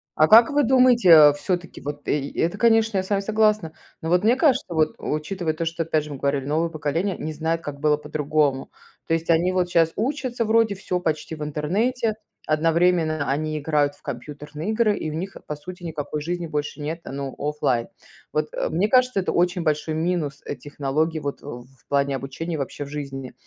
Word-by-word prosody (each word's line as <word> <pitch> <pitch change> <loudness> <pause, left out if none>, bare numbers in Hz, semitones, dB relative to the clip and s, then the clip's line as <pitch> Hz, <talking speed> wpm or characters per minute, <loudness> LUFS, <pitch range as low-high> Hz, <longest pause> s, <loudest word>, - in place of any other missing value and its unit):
А 155 - +5
как 230 +2 +8
вы 290 0 +3
думаете, 250 -5 +4
э, 150 -3 +9
все-таки, 175 +3 -4
вот, 145 0 -7
э, - - +2
й 140 -1 -6
это, 170 +5 0
конечно, 225 -1 +3
я 185 - +1
с 190 - -11
вами 200 - +2
согласна, 215 -4 +1 0.3
но, 160 - -4
вот, 180 +2 +3
мне 235 +4 +4
кажется, 280 -3 +3
вот, 155 -1 +1
учитывая 155 +2 -2
то, 165 +1 -3
что, 165 0 -2
опять 155 -2 0
же, 150 - -9
мы 140 - -5
говорили, 140 0 -1
новое 160 +4 0
поколение 165 +5 -2
не 155 - -4
знает, 165 +2 -1
как 145 -3 -7
было 150 -1 +3
по-другому. 150 -2 -1 0.4
То - - +1
есть 165 +1 -1
они, 170 +2 +3
вот, 180 -1 0
щас 165 -2 +3
учатся 250 -1 -1
вроде, 220 -1 +3
всё 180 -2 -3
почти 160 -1 -2
в 150 - -6
интернете, 210 - 0 0.3
одновременно 160 -1 +2
они 155 +2 -1
играют 145 -1 +1
в - - -28
компьютерные 150 - -6
игры, 220 -2 +2
и 155 - -3
у - - -5
них, 190 +4 -5
по 150 - -3
сути, 180 +4 -10
никакой 150 -2 -4
жизни 175 +2 -3
больше 150 0 -4
нет, 155 +3 -4
ну, 135 0 -6
оффлайн. 145 -5 -1 0.4
Вот, - - 0
э, - - -2
мне 200 +4 +1
кажется, 255 -3 +3
это 185 - -1
очень 175 0 +1
большой 155 0 0
минус, 160 -4 -1
э, - - -4
технологии, 150 +3 -2
вот, 145 -2 -5
в 120 -4 -8 0.2
плане 140 -1 +1
обучения 155 +5 -5
вообще 145 +1 -4
в - - -10
жизни. 135 -3 -6
160 Hz, 200 wpm, -23 LUFS, 150-185 Hz, 0.4 s, э